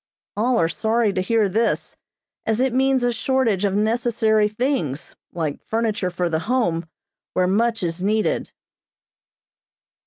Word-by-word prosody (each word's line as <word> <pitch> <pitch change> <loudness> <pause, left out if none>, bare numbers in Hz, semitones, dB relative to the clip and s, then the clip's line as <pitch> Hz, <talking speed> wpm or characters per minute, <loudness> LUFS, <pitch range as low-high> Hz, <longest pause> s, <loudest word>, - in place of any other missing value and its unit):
All 235 +4 +1
are 165 - +3
sorry 220 +4 +1
to 185 - 0
hear 215 +2 +2
this, 225 +4 0 0.5
as 220 0 +1
it 260 -1 +1
means 265 0 +2
a 245 0 +2
shortage 230 -5 +1
of 195 -1 0
necessary 220 -1 +2
things, 210 - -2 0.2
like 155 -4 -3
furniture 220 -4 0
for 180 0 -1
the 160 -1 0
Home, 175 -7 0 0.5
where 185 - +2
much 225 +4 +1
is 170 +1 -2
needed. 215 +3 0
220 Hz, 135 wpm, -22 LUFS, 185-235 Hz, 0.5 s, are